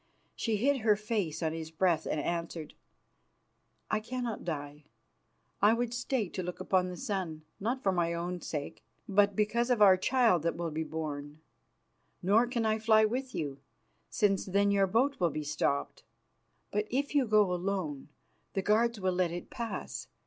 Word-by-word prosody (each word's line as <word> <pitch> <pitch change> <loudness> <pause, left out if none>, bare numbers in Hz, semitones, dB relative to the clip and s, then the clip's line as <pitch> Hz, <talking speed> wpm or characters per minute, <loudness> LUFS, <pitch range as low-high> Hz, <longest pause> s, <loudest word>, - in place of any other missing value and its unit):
She 225 -3 0
hid 275 +6 +2
her 220 -3 +3
face 205 -7 -2
on 160 0 0
his 160 -1 -5
breast 165 0 +1
and 155 - -1
answered, 170 0 -3 1.2
"I 220 - +2
cannot 240 0 -4
die. 145 -2 -5 0.8
I 210 +2 +6
would 240 0 -2
stay 245 -3 -1
to 185 - -4
look 180 0 -5
upon 185 -1 +1
the 180 - -7
sun, 170 -7 -3 0.2
not 245 +6 -2
for 195 - +3
my 170 -2 +1
own 175 +1 -3
sake, 145 -3 -5 0.2
but 200 0 +3
because 235 +4 +1
of 245 -3 +3
our 195 -3 +7
child 225 -3 +3
that 170 +2 0
will 170 -1 -3
be 160 +1 -2
born. 150 -2 -5 0.8
Nor 215 +6 +4
can 235 -2 -1
I 220 0 +1
fly 220 0 +5
with 255 +4 -3
you, 140 -3 -3 0.5
since 195 -2 +1
then 200 +2 +3
your 195 -1 +3
boat 250 +8 +1
will 175 -2 +3
be 155 -1 -4
stopped. 145 -1 -1 0.7
But 210 +1 0
if 280 +4 -1
you 280 -4 +3
go 210 -4 +4
alone, 175 -6 -3 0.4
the 195 - -1
guards 230 +2 +2
will 185 -1 0
let 180 -1 +1
it 175 +1 -7
pass. 235 -3 -5
195 Hz, 170 wpm, -31 LUFS, 170-225 Hz, 1.2 s, our